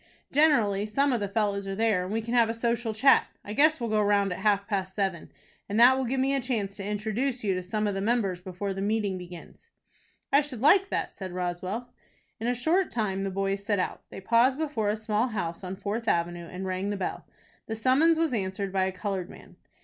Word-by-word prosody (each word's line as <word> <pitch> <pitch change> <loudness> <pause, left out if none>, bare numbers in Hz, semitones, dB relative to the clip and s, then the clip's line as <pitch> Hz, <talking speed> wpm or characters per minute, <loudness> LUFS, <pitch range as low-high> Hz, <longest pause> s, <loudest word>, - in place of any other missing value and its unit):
Generally, 230 -9 +3
some 275 +6 +1
of 240 - +1
the 205 - -2
fellows 200 -1 -1
are 195 - -3
there, 215 -4 +2
and 185 - -5
we 225 +1 -1
can 235 +2 -4
have 235 -2 +4
a 225 - -2
social 235 0 -1
chat. 220 +6 +4 0.2
I 205 - -5
guess 310 +5 +4
we'll 235 -2 -3
go 215 -1 +3
round 200 -2 +2
at - - -7
half 200 0 +2
past 190 -2 -2
seven, 190 -5 -2 0.4
and 205 +2 0
that 250 +2 +8
will 265 0 -1
give 260 +2 -1
me 270 +1 +2
a 275 - +1
chance 220 -6 -2
to 200 - -6
introduce 220 +5 -2
you 200 -2 +1
to 185 - -2
some 210 +4 -2
of 205 - 0
the 195 - -3
members 200 -5 0
before 190 +2 -4
the 195 - -5
meeting 205 -2 0
begins." 175 -1 -12 0.6
"I 280 - +7
should 280 -5 -6
like 380 - +5
that," - - -2
said 190 -2 -7
Roswell. 185 +6 -4 0.5
In 225 - -3
a 245 - +1
short 330 +9 +1
time 195 -4 -2
the 195 - -1
boys 195 +1 -2
set 205 0 0
out. 185 - -2
They - - -8
paused 235 +6 +3
before 285 -10 -1
a 210 - +1
small 220 +2 0
house 190 -7 -4
on 185 +1 -5
Fourth 215 +4 -4
Avenue, 170 -1 0
and 180 +3 -6
rang 185 +1 -2
the 205 - -2
bell. 190 - -4 0.4
The 220 - -3
summons 275 +8 +3
was 325 -4 +1
answered 195 -2 -2
by 190 -1 +2
a 190 - -1
colored 190 -1 -4
man. - - -14
210 Hz, 235 wpm, -27 LUFS, 195-240 Hz, 0.6 s, that